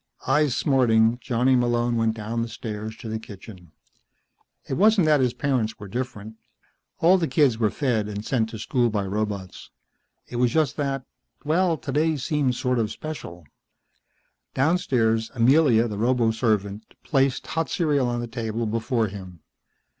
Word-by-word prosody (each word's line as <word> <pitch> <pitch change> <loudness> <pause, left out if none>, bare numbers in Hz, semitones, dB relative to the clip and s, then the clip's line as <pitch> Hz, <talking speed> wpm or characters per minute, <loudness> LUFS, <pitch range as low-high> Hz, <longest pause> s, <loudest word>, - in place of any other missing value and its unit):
Eyes 145 -1 +2
smarting, 120 -4 +3
Johnny 125 +1 +2
Malone 120 -1 +1
went 115 -1 +1
down 115 +1 -3
the 115 - -2
stairs 110 -1 -6
to - - -9
the 110 0 -3
kitchen. 95 -5 -12 1.0
It - - -3
wasn't 205 +3 +4
that 150 -2 +4
his 125 -2 +1
parents 125 -6 -1
were 105 - -9
different. 110 -1 -6 0.6
All 180 +3 +5
the 165 - 0
kids 130 -4 +2
were 110 -2 +2
fed 115 -5 -1
and 105 0 -6
sent 115 -4 0
to 110 - -7
school 120 +2 0
by 105 -3 -2
robots. 100 -2 -4 0.6
It 120 - -6
was 125 0 +3
just 155 -5 +1
that 135 -3 -2 0.4
well 165 +2 +2
today 155 +2 0
seemed 140 -2 0
sort 125 -1 0
of 110 -2 0
special. 115 - -8 1.1
Downstairs 125 -8 +1
Amelia, 120 -1 +4
the 105 -2 -5
roboservant, 110 -4 +1 0.2
placed 135 -3 +1
hot 165 0 -2
cereal 145 -7 +1
on 120 0 -2
the 120 - -4
table 115 -1 -3
before 115 +2 0
him. 95 -4 -10
120 Hz, 155 wpm, -24 LUFS, 110-135 Hz, 1.1 s, All